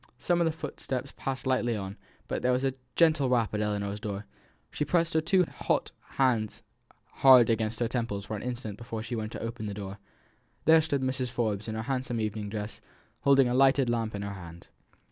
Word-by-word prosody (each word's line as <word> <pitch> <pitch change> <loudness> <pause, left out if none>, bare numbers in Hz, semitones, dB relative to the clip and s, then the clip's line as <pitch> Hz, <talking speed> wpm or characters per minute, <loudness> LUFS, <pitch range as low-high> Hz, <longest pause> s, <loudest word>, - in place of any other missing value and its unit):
Some 175 +6 +1
of - - +4
the 160 - +2
footsteps 140 -4 -5
passed 135 -1 -4
lightly 125 -3 +1
on; 95 -1 -5 0.3
but - - -2
there 125 - +2
was 125 +1 +1
a 135 -1 +1 0.2
gentle 155 -5 +4
rap 115 -4 +2
at 105 - 0
Ellinor's 105 -1 -2
door. 105 -2 -5 0.5
She - - -1
pressed 165 +2 +1
her 160 - +3
two 180 +3 +3
hot - - -1 0.3
hands 120 -6 +1 0.5
hard 125 -4 +8
against 110 0 0
her 120 - +1
temples 115 -4 -2
for 110 - -4
an 105 - -5
instant 120 -4 -5
before 115 -2 -5
she 120 +2 -4
went 110 -1 -3
to - - -5
open 115 -1 -4
the 100 - -4
door. 100 0 -6 0.7
There 160 +1 +7
stood 140 -4 -1
Mrs. 130 -1 -1
Forbes 110 -4 -1
in 110 - -3
her 110 - -3
handsome 125 -2 -2
evening 105 -1 -2
dress, 105 0 -5 0.4
holding 140 -2 +5
a 120 - 0
lighted 135 -1 +4
lamp 115 -2 -1
in 100 - -4
her 100 0 -4
hand. 85 -3 -11
120 Hz, 205 wpm, -29 LUFS, 105-135 Hz, 0.7 s, hard